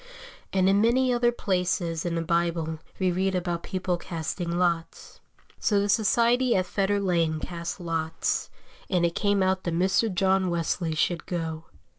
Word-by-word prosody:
And 190 -1 +2
in 195 +1 +4
many 250 +3 +3
other 240 0 +3
places 180 -6 -1
in 170 - -1
the 165 - -1
Bible 165 -1 0 0.2
we 185 -1 +1
read 190 +2 0
about 175 -2 -2
people 185 -1 -2
casting 170 0 -4
lots. 170 -2 -2 0.4
So 205 -2 +2
the 200 +1 0
society 235 +3 +3
at 185 - +2
Fetter 200 +2 0
Lane 170 -5 +1
cast 170 +2 -5
lots, 165 -2 -2 0.4
and 180 -2 +2
it 170 - 0
came 200 0 +1
out 185 0 +1
that 170 -2 -2
Mr. 190 +5 +2
John 190 0 +2
Wesley 170 -1 -1
should 170 +2 0
go. 165 -2 -4
180 Hz, 160 wpm, -26 LUFS, 170-195 Hz, 0.4 s, in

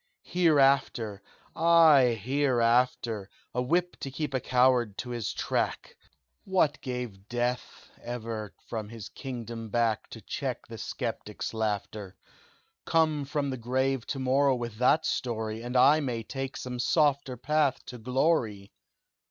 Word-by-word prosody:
"'Hereafter!' 135 - +2 0.3
Ay 155 -8 +6
hereafter! 120 -4 +1 0.2
A 125 - 0
whip 175 +7 0
to 135 - -4
keep 140 +1 -4
a 130 - +1
coward 125 -4 +2
to 125 - -5
his 120 -4 -2
track! - - -2 0.5
What 170 -6 +1
gave 125 -7 -6
Death 120 +1 -3
ever 115 -3 -5 0.2
from 110 -3 -4
his 115 -3 -8
kingdom 115 -4 -6
back 115 -1 0
To - - -9
check - - -4
the - - -9
sceptic's - - -4
laughter? 105 -2 -3 0.7
Come 155 -3 +2
from 140 -1 -2
the 130 - -3
grave 130 +2 -1
to - - -3
morrow 135 +1 +3
with 120 -3 -5
that 130 +5 +4
story, 110 -2 -2
And 125 +2 -2
I 145 +5 +6
may 125 -6 -2
take 135 +3 -5
some 125 -1 -5
softer 140 -2 +2
path 150 +2 +1
to 125 - -8
glory. 120 -5 0
125 Hz, 135 wpm, -28 LUFS, 115-140 Hz, 0.7 s, Ay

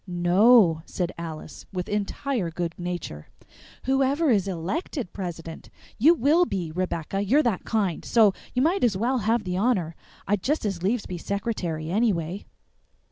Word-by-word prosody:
"No," 175 0 +5
said 180 -1 -2
Alice, 160 -3 -8
with 180 -2 -4
entire 210 0 -2
good 170 0 -3
nature, 175 - -5 0.6
"whoever 270 +3 +2
is 200 -4 +2
ELECTED 195 - -3
president, 165 -3 -7 0.3
you 315 +9 +6
WILL 320 +5 +3
be, 175 -5 -3
Rebecca 180 +2 -2
you're 265 +10 +3
that 225 -7 -1
kind 200 -7 -1
so 220 -4 +4 0.2
you 250 - +3
might 345 +3 +2
as 220 -6 +3
well 245 +5 +1
have 225 +2 +1
the 180 -1 -2
honor; 190 -7 +1 0.3
I'd 205 -1 +1
just 295 +1 0
as 195 -4 -2
lieves 210 +5 0
be 180 -2 -6
secretary, 175 -6 -3
anyway." 195 -4 0
195 Hz, 150 wpm, -25 LUFS, 175-240 Hz, 0.6 s, you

